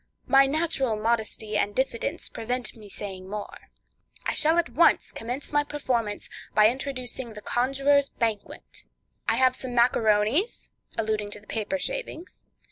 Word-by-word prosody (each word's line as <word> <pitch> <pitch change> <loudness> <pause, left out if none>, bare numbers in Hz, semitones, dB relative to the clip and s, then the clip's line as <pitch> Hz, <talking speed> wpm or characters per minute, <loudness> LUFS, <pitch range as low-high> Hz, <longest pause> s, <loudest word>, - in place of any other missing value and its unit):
My 275 0 +6
natural 275 -5 +1
modesty 220 -1 -1
and 205 0 0
diffidence 265 +4 -1
prevent 245 +2 -3
my 215 -2 -12
saying 190 -2 -6
more. 210 0 -7 0.6
I - - +1
shall 320 +2 +4
at 340 -7 +2
once 325 +8 +4
commence 245 +5 -5
my 290 0 +4
performance 240 -8 -2 0.3
by 215 0 +7
introducing 255 -2 -4
the 210 - -9
Conjuror's 275 +3 +2
Banquet. 220 -3 -3 0.5
I - - +3
have 255 +1 +4
some 255 -2 -6
macaronies 235 - +2 0.3
(alluding 215 -2 -1
to 210 - -6
the 210 - -21
paper 225 +7 -2
shavings). 455 - -5
240 Hz, 140 wpm, -26 LUFS, 215-275 Hz, 0.6 s, by